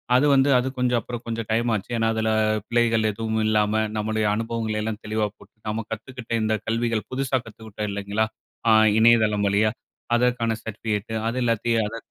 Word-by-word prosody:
அது 135 +4 +4
வந்து 135 +1 +4
அது 125 +1 0
கொஞ்சம் 125 -1 +2
அப்புறம் 120 0 -7
கொஞ்சம் 115 -1 -4
டைம்மாச்சு. 115 -2 0
ஏனா, 115 0 +1
அதில 110 0 0 0.4
பிழைகள் 115 -2 +2
ஏதுவும் 110 +1 -2
இல்லாம, 105 -1 +2 0.2
நம்முடைய 110 0 -1
அனுபவங்களையெல்லாம் 110 -1 -2
தெளிவா 110 0 0
போட்டு - - -19
நாம 110 +1 -2
கத்துக்கிட்ட 115 +2 -7
இந்த 110 0 +1
கல்விகள் 115 -1 -1
புதுசா 130 0 0
கத்துக்கிட்டோம். 110 -2 -7
இல்லைங்களா? 100 +2 -1 0.4
ஆ - - +6 0.3
இணையதளம் 110 -3 +4
வழியா 105 +2 +3 0.5
அதற்கான 120 -2 +1
சர்டிஃபிகேட். 110 0 -4 0.2
அது 125 - -4
எல்லாத்தையும் 115 -1 +1
அத, 115 +2 -6
110 Hz, 155 wpm, -24 LUFS, 110-115 Hz, 0.5 s, ஆ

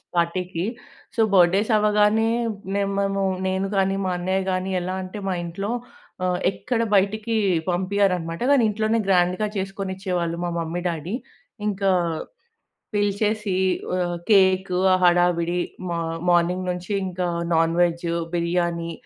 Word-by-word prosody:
పార్టీకి. 175 0 -1 0.5
So, 230 - +2
birthdays 190 +4 +4
అవ్వగానే 210 +1 +3 0.5
మే 200 - +1 0.2
మేము 195 0 0 0.2
నేను 190 +1 0
గానీ, 195 0 +2
మా 185 - 0
అన్నయ్య 185 +2 0
గాని 185 +1 -1
ఎలా 185 +1 -3
అంటే 185 +3 -7
మా 185 - 0
ఇంట్లో 195 +5 -4 0.6
ఆహ్, 180 -1 0
ఎక్కడ 235 +3 -2
బయటకి 215 +3 +1 0.3
పంపియ్యరనమాట. 180 -2 0
గానీ 275 -4 +5
ఇంట్లోనే 220 +2 0
గ్రాండ్‌గా 180 +2 +2
చేసుకొనిచ్చేవాళ్ళు 190 -3 -3
మా - - -1
మమ్మీ, 170 +2 -3
డ్యాడీ. 170 +5 -4 0.5
ఇంకా 195 -1 +1 1.0
పిలిచేసి 205 -1 0 0.4
ఆహ్, 175 -1 -1
కేక్ 190 -2 +4 0.2
ఆ - - +6
హడావిడి 175 0 +3 0.3
మ - - -3 0.4
మార్నింగ్ 175 +1 +2
నుంచి 180 +2 -4
ఇంకా 180 0 -2 0.3
నాన్ 165 0 +3
వెజ్, 170 0 +1 0.3
బిర్యానీ. 170 -1 -1
185 Hz, 125 wpm, -23 LUFS, 175-200 Hz, 1.0 s, ఆ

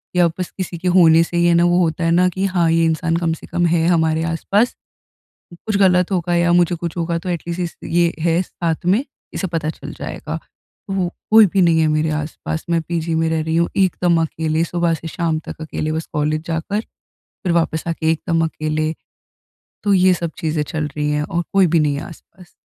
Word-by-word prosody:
या 175 -1 +5
बस 180 - -3
किसी 180 -2 -4
के 180 - -4
होने 165 -2 +6
से 170 +1 -4
ही 170 - +3
है 175 - +4
ना 170 - +4
वो 175 0 +3
होता 165 -1 0
है 165 - +2
ना 180 +2 +4
कि 190 +2 -2
हाँ 180 -3 +1
ये 165 0 +3
इंसान 165 +1 0
कम 170 -1 0
से 160 - -10
कम 175 +1 0
है 165 -1 +2
हमारे 160 -2 +2
आस-पास 195 +8 0 0.9
कुछ 215 -2 0
गलत 180 -2 +3
होगा 175 -1 0
या 170 0 +3
मुझे 175 0 +3
कुछ 170 0 -5
होगा 170 0 -1
तो 175 - -7
एट 175 -2 -2
लीस्ट 170 +1 -3
इस 170 - -5
ये 170 0 +2
है 165 +1 +2
साथ 170 -2 -3
में, 205 +9 +3 0.3
इसे 190 - -2
पता 165 -3 -2
चल - - -9
जाएगा। - - -5 0.5
वो 190 -2 0 0.2
कोई 220 0 +8
भी 190 +1 +1
नहीं 165 -2 +4
है 160 - +3
मेरे 155 +1 +1
आस-पास। 155 +1 -4
मैं 170 -1 +2
पीजी 165 0 -2
में 160 0 +1
रह 160 0 0
रही 160 +1 -1
हूँ 170 0 +2
एकदम 180 -3 +2
अकेले, 160 0 -1
सुबह 170 0 0
से 165 +1 -6
शाम 165 -1 -1
तक - - -8
अकेले 155 0 -3
बस 160 +1 -3
कॉलेज 150 +1 0
जाकर 170 +6 -2 0.6
फिर 180 - +1
वापस 165 -2 0
आके 160 -1 0
एकदम 165 0 0
अकेले। 155 0 -2 0.9
तो 205 - +3
ये 185 0 +5
सब 170 -2 -3
चीज़ें 155 -1 -1
चल 155 0 -3
रही 150 0 0
हैं 150 0 0
और 170 +3 -2
कोई 195 -1 +5
भी 165 0 +2
नहीं 150 -1 +1
है 140 - -4
आस-पास। 175 +1 -15
170 Hz, 220 wpm, -19 LUFS, 160-175 Hz, 0.9 s, कोई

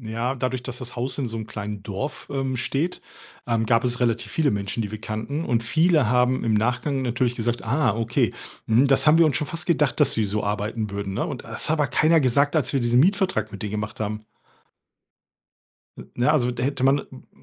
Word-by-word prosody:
Ja, 115 +3 -2
dadurch, 130 -1 -2
dass 125 -1 -6
das 125 -1 -8
Haus 125 +2 -2
in 130 -4 -1
so 115 - -5
'nem 110 - -5
kleinen 105 -2 -6
Dorf, 105 +8 -5
ähm, 135 -2 -2
steht, 140 +8 -2 0.5
ähm, 115 -2 +1
gab 115 +2 +2
es 125 0 -1
relativ 115 -1 0
viele 155 -3 +1
Menschen, 100 +2 -2
die 105 - -5
wir 110 0 -7
kannten 115 +8 -4
und 120 -2 +1
viele 160 -1 +3
haben 125 +1 +2
im 115 - +1
Nachgang 125 +5 0
natürlich 120 0 0
gesagt: 120 +1 -2
„Ah 120 -2 +1
okay, 115 0 0 0.3
mhm, 115 +5 +4
das 135 +2 +4
haben 155 +1 +7
wir 170 - +7
uns 155 - +1
schon 150 - -3
fast 165 +4 -4
gedacht, 150 -6 +1
dass - - +4
die 110 -2 +1
so 105 +2 -2
arbeiten 105 +1 -2
würden,“ 100 -1 -4
ne? - - -1
Und - - -6
das - - -4
hat 160 - +2
aber 145 - +3
keiner 155 +5 +4
gesagt, 140 +3 +2
als 145 -5 +1
wir 135 - +2
diesen 120 +1 +3
Mietvertrag 185 - +1
mit 100 -1 -8
denen 105 -1 -4
gemacht 105 0 -4
haben. 105 0 -4 1.7
N - - -11
na, 120 +3 +3
also, 125 -5 +2
da 120 0 -4
hätte 135 -1 -1
man 135 +2 +4
m 130 - -15
120 Hz, 225 wpm, -24 LUFS, 110-140 Hz, 1.7 s, haben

